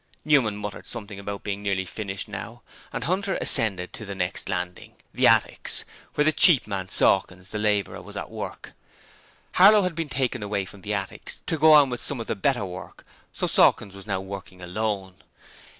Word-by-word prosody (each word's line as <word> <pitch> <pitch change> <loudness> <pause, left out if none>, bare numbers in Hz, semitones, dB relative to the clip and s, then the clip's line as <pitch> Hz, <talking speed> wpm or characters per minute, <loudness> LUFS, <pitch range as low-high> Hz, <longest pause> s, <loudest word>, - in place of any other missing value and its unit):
Newman 130 -9 +3
muttered 105 -1 -7
something 105 -4 -6
about 100 0 -6
being 100 -1 -3
nearly 100 -2 -1
finished 95 +1 -5
now, 110 +3 -8 0.3
and - - -4
Hunter 190 +4 0
ascended 100 -9 +1
to - - -7
the 100 -1 -6
next 90 -2 -2
landing 90 0 -4 0.2
the - - +4
attics, - - +2 0.3
where 150 - +2
the 155 - +5
cheap 155 -2 +6
man 95 -3 -4
Sawkins, 95 0 +2
the 105 - -3
labourer 105 -1 0
was - - -9
at - - -6
work. - - -7 0.8
Harlow 205 +2 +7
had 180 -1 -1
been 165 -1 -4
taken 130 -3 -1
away 100 -1 -2
from 100 +1 -11
the 105 +2 -2
attics 95 -1 -5
to - - -1
go 155 0 +6
on 145 -3 +6
with 120 - -4
some 140 - 0
of 115 - -4
the - - -2
better 120 +1 0
work, 90 0 -9 0.3
so - - -2
Sawkins 100 -3 +3
was 100 +1 -11
now 95 -2 -1
working 95 -1 -8
alone. 95 0 -3
105 Hz, 190 wpm, -25 LUFS, 95-130 Hz, 0.8 s, Harlow